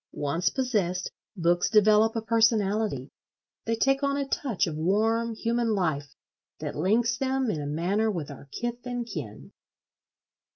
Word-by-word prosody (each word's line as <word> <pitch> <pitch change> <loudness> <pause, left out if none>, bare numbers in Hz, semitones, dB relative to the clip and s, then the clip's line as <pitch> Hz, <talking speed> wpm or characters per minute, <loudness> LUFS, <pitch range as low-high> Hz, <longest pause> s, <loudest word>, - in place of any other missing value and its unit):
Once 150 +5 0
possessed, 205 -9 -1 0.3
books 175 0 +2
develop 215 +1 +5
a 225 - -2
personality: 215 - +1 0.5
they 230 - 0
take 270 +4 +2
on 280 0 +1
a 280 -1 -2
touch 260 -7 0
of 160 - -4
warm 220 +7 +1
human 230 0 0
life 145 -7 -2 0.4
that - - -5
links 225 - +1
them 265 -3 0
in 155 - -3
a 145 - -4
manner 185 +9 0
with 165 -8 -4
our 140 0 -12
kith 240 +4 -4
and 245 -1 -3
kin. 110 - -7
215 Hz, 150 wpm, -27 LUFS, 170-235 Hz, 0.5 s, develop